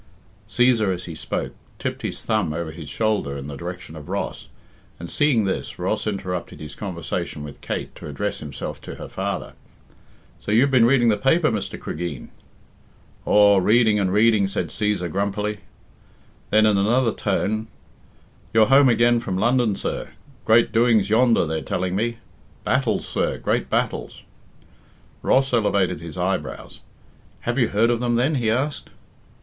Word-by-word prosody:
Cæsar, 120 -4 +3
as 90 0 -4
he 85 - -7
spoke, - - -4 0.2
tipped - - -4
his - - -5
thumb 105 -8 0
over 80 0 -4
his 80 -3 -9
shoulder 105 -8 -1
in 70 - -7
the 70 0 -6
direction 90 +1 -7
of 75 -2 -10
Ross, - - -4 0.5
and, 85 0 -7
seeing 145 -7 +3
this, 95 - -3
Ross - - -2
interrupted 95 -4 -4
his 75 -2 -8
conversation 85 -4 -4
with 75 -1 -10
Kate - - -4
to - - -9
address - - -3
himself - - -7
to - - -8
her - - -8
father. - - -4 0.9
"So - - -5
you've 125 +6 +4
been 120 -3 +5
reading 120 -2 +4
the 105 - +2
paper, 155 +8 +3
Mr. 100 -3 -4
Cregeen?" 80 -4 -5 1.0
"Aw, 100 -1 +6
reading 110 +2 +4
and 95 -2 +1
reading," 105 -1 +4
said 100 +2 -3
Cæsar 105 -4 -1
grumpily. 100 +2 -2 0.9
Then 110 0 +4
in 105 -2 +3
another 115 +4 +2
tone, 110 +2 -1 0.9
"You're 110 -1 +6
home 135 -1 +7
again 120 0 +4
from 95 -5 -3
London, 120 0 +2
sir? - - -4 0.3
Great 115 +1 +4
doings 110 -3 +3
yonder, 115 -3 +4
they're 80 0 -2
telling 90 0 -2
me. 115 +3 -1 0.5
Battles, - - 0
sir, - - -1
great - - -1
battles." - - -2 1.0
Ross 135 0 +2
elevated 100 -8 +1
his 85 -1 -8
eyebrows. 90 -7 -3 0.6
"Have 120 +3 -1
you 120 - +3
heard 115 +4 +2
of 120 - 0
them 120 -1 0
then?" 130 +6 +2
he 120 -6 0
asked. 135 +6 -1
105 Hz, 155 wpm, -23 LUFS, 90-120 Hz, 1.0 s, home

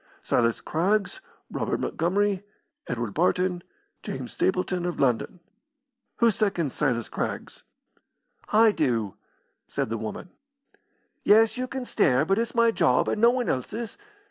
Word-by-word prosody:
Silas 115 -1 +1
Craggs, 200 - 0 0.3
Robert - - -2
Montgomery, 195 +3 0 0.5
Edward 120 -4 -3
Barton, 180 +1 +1 0.4
James - - -6
Stapleton, 185 -1 0
of 175 - -4
London. 135 +7 0 0.7
Who 235 -1 +4
seconds 190 - -1
Silas 120 -4 0
Craggs?" - - -5 0.9
"I 220 +1 +6
do," 115 - 0 0.5
said - - -2
the 115 - -2
woman. 110 - -6 0.9
"Yes, 220 +2 +5
you 255 0 -3
can 260 -1 -5
stare, 145 - +2
but 195 +5 +2
it's 235 +1 -2
my 230 0 +4
job, 125 - +2
and 210 - -1
no 235 - +7
one 245 -1 0
else's. 215 - -3
185 Hz, 130 wpm, -26 LUFS, -, 0.9 s, no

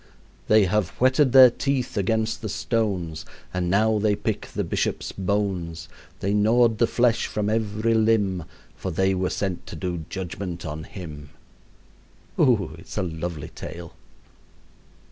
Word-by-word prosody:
"They 110 -2 +5
have 95 -1 +1
whetted 130 +1 +4
their 130 -1 +9
teeth 135 -2 -1
against 110 +2 0
the 110 - -4
stones, 100 -7 -1 0.3
And 90 -1 -1
now 110 +3 +3
they 105 0 +2
pick 105 +1 -3
the - - -3
bishop's - - -2
bones; 90 -4 -2 0.3
They 100 +2 0
gnawed 110 +2 +3
the 115 - +4
flesh 120 -1 +2
from 105 0 -1
every 110 0 0
limb, 105 -6 +2 0.3
For 95 - -5
they 95 +3 +1
were 90 -1 0
sent 95 -3 -3
to - - -7
do 85 0 -4
judgment 90 -2 -5
on 80 0 -5
him." 75 -7 -9 1.1
Oh, 110 - +3
it's - - -10
a - - +1
lovely 80 -2 -5
tale. 85 0 -9
100 Hz, 145 wpm, -24 LUFS, 90-110 Hz, 1.1 s, their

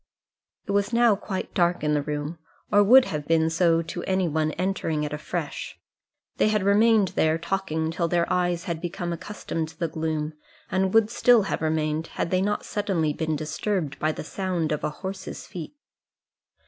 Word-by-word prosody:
It - - -3
was 200 +2 +1
now 235 -2 +4
quite 195 -1 -5
dark 175 -1 +1
in 150 0 +2
the 150 - +2
room, 150 +2 -4 0.3
or 205 0 +6
would 250 +6 +7
have 150 -2 -4
been 160 0 +3
so 165 0 +3
to 170 +2 -5
any 185 -1 +1
one 155 0 0
entering 175 -4 -1
it 150 0 -3
afresh. 155 +1 -5 0.6
They - - +3
had 215 -2 +1
remained 210 0 +4
there 160 -1 +2
talking 165 -2 -2
till 170 +1 -1
their 170 0 +2
eyes 175 -1 0
had 170 -3 -4
become 175 0 -3
accustomed 165 -2 -4
to 160 - -16
the 170 - 0
gloom, 155 -1 -2 0.4
and 190 0 +1
would 225 -1 +5
still 240 -2 +5
have 195 - -2
remained, 155 0 0
had - - -1
they 185 0 +2
not 205 +2 -1
suddenly 185 -8 0
been 160 0 -1
disturbed 155 0 -2
by 155 - +1
the - - -6
sound 175 -2 -2
of 150 - -2
a - - +1
horse's 190 +5 -7
feet. 175 - -8
170 Hz, 185 wpm, -25 LUFS, 155-195 Hz, 0.6 s, would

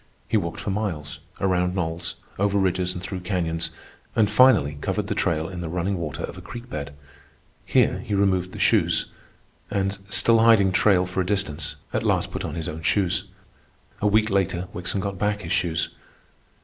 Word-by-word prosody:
He - - -1
walked 85 -6 -1
for 100 - -3
miles, 85 -8 -3 0.2
around 90 -1 +1
knolls, 85 -2 -2 0.2
over 100 0 +2
ridges 95 -1 +1
and 90 - -6
through 95 0 -4
canyons, 85 -3 -1 0.5
and 105 -2 +3
finally 105 - +5
covered - - -1
the - - -2
trail 80 -1 0
in 90 -1 -7
the 85 -2 -4
running 90 +2 -1
water 75 -4 -4
of - - -6
a - - -10
creek 120 +1 -9
bed. 70 -1 -5 0.7
Here - - +3
he 105 - -3
removed 95 -2 +2
the - - -9
shoes, - - +3 0.6
and, 100 0 -1
still 115 +2 +5
hiding 110 -4 +6
trail 95 -1 +4
for 90 +1 -1
a - - +1
distance, 85 -7 -1 0.2
at - - +1
last - - +1
put - - -4
on 75 - -4
his 80 -2 -4
own 80 +1 -5
shoes. 95 +3 +1 0.8
A 105 - +3
week 110 +1 +3
later 95 -2 0
Wickson 90 +2 -2
got 100 -1 -4
back 105 0 0
his 80 - -6
shoes. 85 -3 +1
95 Hz, 185 wpm, -24 LUFS, 85-100 Hz, 0.8 s, hiding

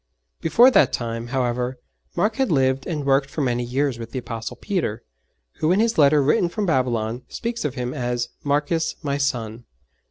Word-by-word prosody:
Before 235 +10 +6
that - - +5
time, 115 0 -3
however, 125 0 -1 0.4
Mark 215 +1 +1
had 265 -6 +1
lived 135 -2 +1
and 150 -5 -3
worked 135 0 +2
for 150 - -3
many 125 -2 0
years 130 0 -1
with 115 -1 -7
the 130 - -6
Apostle 115 -2 -5
Peter, 175 - -2 0.6
who 155 - +2
in 190 - +3
his 225 -4 +1
letter 145 0 +5
written 150 +5 +2
from 210 +3 -2
Babylon 125 - 0
speaks 235 0 -4
of 145 -3 -2
him 125 -1 -3
as 120 -1 -2
'Marcus 150 +3 0
my 140 -1 -1
son.' 120 -4 -2
135 Hz, 180 wpm, -23 LUFS, 120-155 Hz, 0.6 s, Before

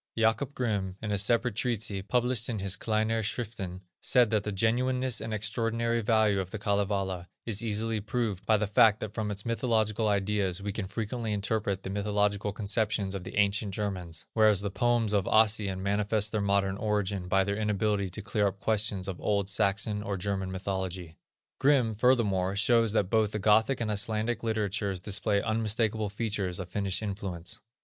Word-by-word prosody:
Jacob 115 +5 +1
Grimm, 100 -6 -2
in 105 - -4
a 100 - +1
separate 115 +3 +2
treatise, 110 -3 -2
published 125 0 +1
in 115 - -2
his 95 -1 -2
Kleinere 110 0 0
Schriften, 100 -4 -4 0.2
said 120 -3 +3
that 105 -2 +2
the 105 - -3
genuineness 125 +4 +1
and 115 - -5
extraordinary 115 +2 0
value 110 -2 +3
of 95 -2 -3
the 110 - -5
Kalevala 100 -3 -1 0.2
is 105 -3 -2
easily 110 0 -1
proved 105 -3 -2
by 110 - +5
the 105 - 0
fact 105 +1 +5
that 105 -1 -5
from 110 -2 -2
its 100 -1 -5
mythological 110 -2 +1
ideas 100 -2 0
we 100 +1 -3
can 105 -3 -3
frequently 110 +2 -3
interpret 100 -1 -1
the 95 - -5
mythological 105 0 0
conceptions 105 -1 -1
of 95 -2 -5
the - - -8
ancient 100 0 +1
Germans, 90 -6 -3
whereas 110 -3 +4
the 100 -1 -3
poems 120 -1 +1
of 100 -3 +2
Ossian 105 -3 +2
manifest 105 +1 +1
their 110 - 0
modern 100 -1 +1
origin 100 -3 -1
by 95 +1 +3
their 100 +1 -1
inability 105 -2 0
to 95 +4 -8
clear 105 -1 +1
up 100 0 -4
questions 105 -2 0
of 95 -3 -5
old 100 -1 0
Saxon 100 +1 +1
or 100 -2 -3
German 95 0 -2
mythology. 95 -3 -4 0.4
Grimm, 135 -5 +3
furthermore, 105 -5 +2
shows 115 +1 +3
that 100 -4 +1
both 110 -2 +2
the - - -1
Gothic 110 +5 +3
and 110 -2 -1
Icelandic 110 +2 -1
literatures 100 -4 -1
display 100 +1 0
unmistakable 110 -1 0
features 100 -4 -2
of 90 -1 -6
Finnish 100 +1 -2
influence. 95 -4 -5
105 Hz, 175 wpm, -29 LUFS, 100-110 Hz, 0.4 s, by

